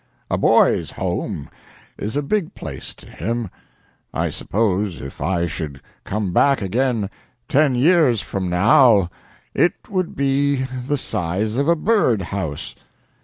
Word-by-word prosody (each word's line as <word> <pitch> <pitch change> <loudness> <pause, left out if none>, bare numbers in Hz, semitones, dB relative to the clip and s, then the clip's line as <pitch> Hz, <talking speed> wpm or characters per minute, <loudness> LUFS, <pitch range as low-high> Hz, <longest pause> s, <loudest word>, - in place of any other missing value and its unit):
"A - - +2
boy's - - +4
home 70 - -3 0.5
is 110 +7 -4
a 145 - 0
big 195 +3 -1
place 70 -4 -8
to - - -16
him. 115 -2 -3 0.6
I - - 0
suppose 100 -2 -1
if 70 - -9
I 85 -2 +1
should 80 -5 -5 0.3
come 100 -3 -2
back 140 +5 +4
again 110 +1 0 0.4
ten 145 -2 +3
years 145 -3 +4
from 95 -2 -3
now 100 - +5 0.4
it 175 - +3 0.2
would 185 -3 -1
be 140 0 +1 0.2
the 145 - +1
size 105 0 -2
of 140 +2 +1
a 170 - +5
bird 155 - +2
house." 95 -9 -4
115 Hz, 135 wpm, -21 LUFS, 95-140 Hz, 0.6 s, now